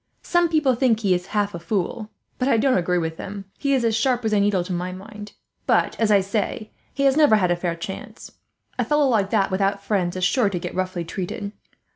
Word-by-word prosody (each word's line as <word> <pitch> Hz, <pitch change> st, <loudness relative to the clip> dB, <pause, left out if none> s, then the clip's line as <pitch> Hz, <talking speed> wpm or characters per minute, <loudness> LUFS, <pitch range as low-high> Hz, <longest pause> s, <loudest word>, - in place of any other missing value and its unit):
Some 345 Hz, -1 st, +2 dB
people 305 Hz, -5 st, +3 dB
think 235 Hz, -2 st, +2 dB
he 195 Hz, -4 st, +3 dB
is 180 Hz, +1 st, -2 dB
half 205 Hz, -1 st, -1 dB
a 170 Hz, -, -5 dB
fool, 200 Hz, +4 st, -3 dB, 0.3 s
but 255 Hz, -, +1 dB
I 235 Hz, -, +3 dB
don't 260 Hz, +3 st, +3 dB
agree 180 Hz, 0 st, +1 dB
with 160 Hz, -1 st, -2 dB
them; 195 Hz, 0 st, -7 dB
he 280 Hz, -1 st, +1 dB
is 250 Hz, -3 st, +1 dB
as 225 Hz, -1 st, +2 dB
sharp 245 Hz, +1 st, +1 dB
as 220 Hz, -, +1 dB
a 210 Hz, -, +4 dB
needle, 200 Hz, -3 st, +2 dB
to 180 Hz, +1 st, -5 dB
my 180 Hz, +1 st, -3 dB
mind. 205 Hz, +3 st, -10 dB, 0.3 s
But, -, -, +2 dB
as 225 Hz, -2 st, +2 dB
I 205 Hz, -2 st, +5 dB
say, 210 Hz, +2 st, -3 dB, 0.2 s
he 275 Hz, -, -2 dB
has 270 Hz, -1 st, +4 dB
never 295 Hz, -7 st, +5 dB
had 185 Hz, -4 st, +2 dB
a -, -, +3 dB
fair 175 Hz, -1 st, -2 dB
chance. 190 Hz, +3 st, -8 dB, 0.5 s
A -, -, +3 dB
fellow 295 Hz, +4 st, +2 dB
like 210 Hz, -6 st, +2 dB
that, 200 Hz, -3 st, +1 dB
without 195 Hz, +1 st, 0 dB
friends, 185 Hz, -4 st, 0 dB
is 185 Hz, -, -3 dB
sure 210 Hz, +3 st, +3 dB
to 190 Hz, -, -3 dB
get 170 Hz, -, -5 dB
roughly 185 Hz, -2 st, -2 dB
treated." 190 Hz, +4 st, -5 dB
205 Hz, 235 wpm, -23 LUFS, 185-230 Hz, 0.5 s, I